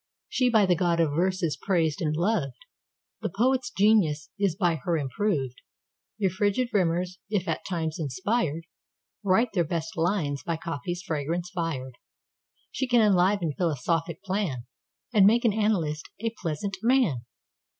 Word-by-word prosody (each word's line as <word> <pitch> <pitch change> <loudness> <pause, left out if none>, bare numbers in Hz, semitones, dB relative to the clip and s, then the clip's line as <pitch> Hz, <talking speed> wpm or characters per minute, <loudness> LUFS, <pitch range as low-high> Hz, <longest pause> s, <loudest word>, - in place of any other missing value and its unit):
She 255 -1 +2
by 220 -4 +5
the 180 -1 +3
god 170 -1 +1
of 160 -3 +3
verse 185 +4 0
is 160 -3 +1
praised 165 -6 0
and 155 -2 0
loved; 165 - 0 0.6
The - - -1
poet's 250 +7 +1
genius 185 -7 +2
is 195 -5 +1
by 175 -4 +1
her 170 0 -1
improved. 140 - -1 0.6
Your 195 -4 +1
frigid 205 +6 +1
rimers, 180 -1 0
if 200 -3 -1
at - - -2
times 165 -4 -2
inspired, 165 - -1 0.6
Write 210 +5 +3
their 175 - +2
best 165 0 -3
lines 160 -5 0
by 165 +3 -2
coffee's 170 +3 -4
fragrance 165 +3 -2
fired. 145 -8 -4 0.7
She 265 - -2
can 245 -2 +4
enliven 185 -4 +3
philosophic 165 0 -1
plan, 185 - -2 0.5
And 200 -3 +7
make 235 +3 +4
an 220 - +4
analyst 185 -9 0
a 225 +1 -1
pleasant 175 +5 -3
man. 230 - +2
175 Hz, 150 wpm, -27 LUFS, 160-205 Hz, 0.7 s, And